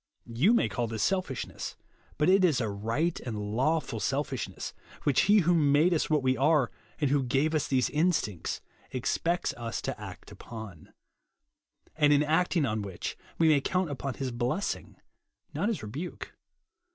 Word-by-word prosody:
You 130 - +3
may - - +3
call 120 -2 -2
this 110 -1 -2
selfishness, 185 -9 -2 0.4
but 150 - +2
it 190 +1 +5
is 160 -8 +4
a 115 - 0
right 115 +12 -1
and 115 -4 -5 0.2
lawful 145 -2 +1
selfishness, 135 0 -2 0.3
which 145 +4 +3
Ho 205 - +6
who 175 +1 +3
made 155 +2 +4
us 160 - 0
what 150 -3 +2
we 130 0 +3
are, 145 -2 +3 0.3
and 145 -4 +1
who 145 -1 +3
gave 135 +5 +1
us 155 - +1
these 130 -2 +2
instincts, 150 - 0 0.3
expects 165 +7 0
us 115 -1 -3
to - - -4
act - - -9
upon; 110 -8 -10 1.0
and 150 -2 +4
in 145 0 +5
acting 160 +1 +2
on 110 -3 -1
which, 100 -3 -5 0.2
we 165 - +4
may 150 -3 +5
count 180 +1 0
upon 140 -1 -4
his 130 -2 -3
blessing, 125 +11 -2 0.6
not 205 - 0
his 220 - -2
rebuke. 145 +12 -6
145 Hz, 165 wpm, -29 LUFS, 120-165 Hz, 1.0 s, Ho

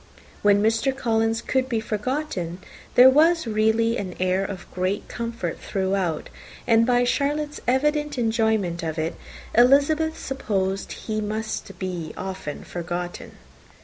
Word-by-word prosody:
When 205 0 +4
Mr. 225 +5 +1
Collins 225 -2 +1
could 260 0 0
be 230 -3 0
forgotten, 215 - -3 0.4
there 250 +1 +9
was 325 +3 +4
really 225 +1 +2
a - - -2
great 185 -2 -8
air 185 +1 +1
of 190 -2 -6 0.4
comfort 230 -7 -4
throughout, 190 -4 -1 0.3
and 230 -1 +4
by 245 -1 +4
Charlotte's 295 +4 -1
evident 295 +3 +1
enjoyment 220 -7 +1
of 160 -1 -3
it, 160 +2 -1 0.4
Elizabeth 285 +6 +4
supposed 195 -7 -2
he 215 -1 -4
must 215 -2 -4
be 175 -4 -4
often 185 -6 -5
forgotten. 175 0 -5
220 Hz, 125 wpm, -24 LUFS, 190-255 Hz, 0.4 s, there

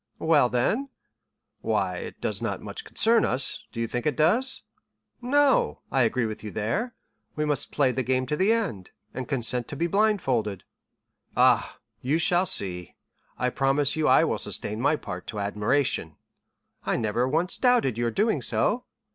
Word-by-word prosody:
"Well, 160 -6 +3
then——" 215 - 0 0.7
"Why, - - 0
it - - -8
does - - -3
not - - -2
much 445 - -7
concern 230 - +3
us, 130 +1 -1
do 115 - -7
you 115 - 0
think 120 +4 -3
it 150 - 0
does?" 225 - +1 0.6
"No; 280 +2 +2
I 135 - +2
agree 120 0 +1
with 110 -1 -6
you 105 - -5
there. 190 - -2 0.4
We 150 - -1
must 145 -3 -1
play 135 -3 +2
the 130 - -1
game 130 +1 0
to 150 - -1
the 190 +7 +2
end, 200 - -1 0.2
and 130 -2 -5
consent 125 -3 -1
to - - -6
be 165 +4 0
blindfolded." 165 - +1 0.7
"Ah, - - +3 0.2
you 140 +5 +1
shall 175 +2 +3
see; 90 - -2 0.4
I 125 0 0
promise 135 +2 +1
you 155 -1 +1
I - - +6
will - - 0
sustain 105 +2 -3
my 145 +4 +3
part 90 -10 -7
to 105 - -5
admiration." 105 - 0 0.7
"I - - 0
never 120 +2 0
once 165 +7 -1
doubted 245 - +3
your 120 0 0
doing 215 - +1
so." 245 +3 0
135 Hz, 170 wpm, -26 LUFS, 115-190 Hz, 0.7 s, I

